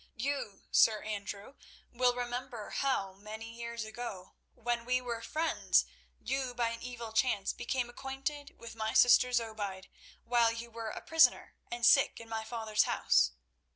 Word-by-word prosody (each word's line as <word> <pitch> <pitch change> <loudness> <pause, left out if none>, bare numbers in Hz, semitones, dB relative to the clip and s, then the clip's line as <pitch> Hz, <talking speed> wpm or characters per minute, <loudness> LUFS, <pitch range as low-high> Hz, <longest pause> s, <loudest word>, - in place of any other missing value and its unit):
"You, 240 -5 -3
Sir 215 -1 +5
Andrew, 205 +2 -5 0.4
will 245 0 +2
remember 245 -2 -4
how, 230 -9 0
many 215 +3 -9
years 235 -1 -5
ago, 220 -4 -7 0.2
when 240 0 -2
we 250 +1 +1
were 240 -2 -4
friends, 320 +6 +1 0.3
you, 265 -2 -2
by 235 -1 +1
an 230 0 -6
evil 235 -2 -7
chance, 220 -4 +1
became 245 0 -2
acquainted 270 +3 -5
with 230 - -9
my 220 -1 -3
sister 250 +1 +6
Zobeide, 215 -5 -2 0.3
while 235 -1 +3
you 230 +1 -7
were 225 -1 -5
a - - -6
prisoner 325 0 +4 0.2
and 240 -1 -1
sick 275 - +5
in 230 - -10
my 225 -1 -3
father's 220 -2 0
house. 65 0 +3
235 Hz, 155 wpm, -32 LUFS, 220-250 Hz, 0.4 s, sister